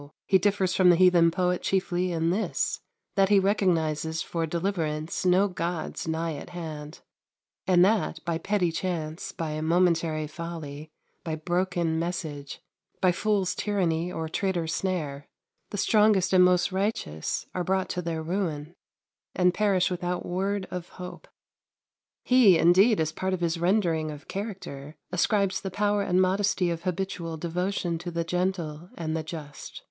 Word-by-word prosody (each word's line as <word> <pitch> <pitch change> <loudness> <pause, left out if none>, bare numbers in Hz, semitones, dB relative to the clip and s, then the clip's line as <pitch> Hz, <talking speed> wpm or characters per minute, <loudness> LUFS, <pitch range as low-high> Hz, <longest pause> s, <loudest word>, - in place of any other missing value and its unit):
He 190 - +4
differs 195 -1 +1
from 185 -2 +5
the 175 - +7
heathen 175 -1 +5
poet 180 +1 0
chiefly 185 -1 0
in 165 0 +1
this, 210 +5 -1 0.3
that 195 -1 +3
he 205 - +6
recognizes 165 -5 +1
for 165 -1 -2
deliverance 165 -2 -2
no 185 +3 +4
gods 170 -3 -4
nigh 160 0 -1
at - - -9
hand, 160 -3 -7 0.7
and 180 -1 +6
that, 205 -5 +1
by 170 -1 -1
petty 190 -2 +1
chance, 165 -2 -3
by 155 -2 -4
momentary 165 -2 +2
folly, 155 -2 -7 0.3
by 160 -2 -2
broken 175 0 0
message, 160 -5 -4 0.4
by 185 -1 +4
fool's 195 0 0
tyranny, 180 -4 0
or 160 -2 -3
traitor's 170 -2 -1
snare, 150 -7 -3 0.4
the 205 - -5
strongest 210 -2 +3
and 185 -1 +7
most 180 +1 +3
righteous 190 - -2
are 180 - -1
brought 190 +1 0
to 180 - -2
their 165 -2 -3
ruin, 165 -3 -3 0.6
and 180 -1 +3
perish 195 -3 +2
without 180 0 -2
word 195 +2 -2
of 180 -1 -5
hope. 180 0 -8 1.0
He, 245 -9 +6
indeed, 190 +6 +5
as 155 -1 0
part 190 +3 -1
of 180 - -9
his 170 0 0
rendering 170 -4 +1
of 150 -1 -9
character, 185 -8 -6 0.2
ascribes 195 +1 +1
the 195 - -4
power 205 +2 +1
and 185 -2 +1
modesty 185 -1 +2
of 170 +1 -5
habitual 180 -3 -3
devotion 175 +1 -2
to 175 +1 -5
the 170 0 -2
gentle 175 -2 -2
and 160 -1 -2
the 160 - -1
just. 155 -2 -8
175 Hz, 150 wpm, -27 LUFS, 160-190 Hz, 1.0 s, the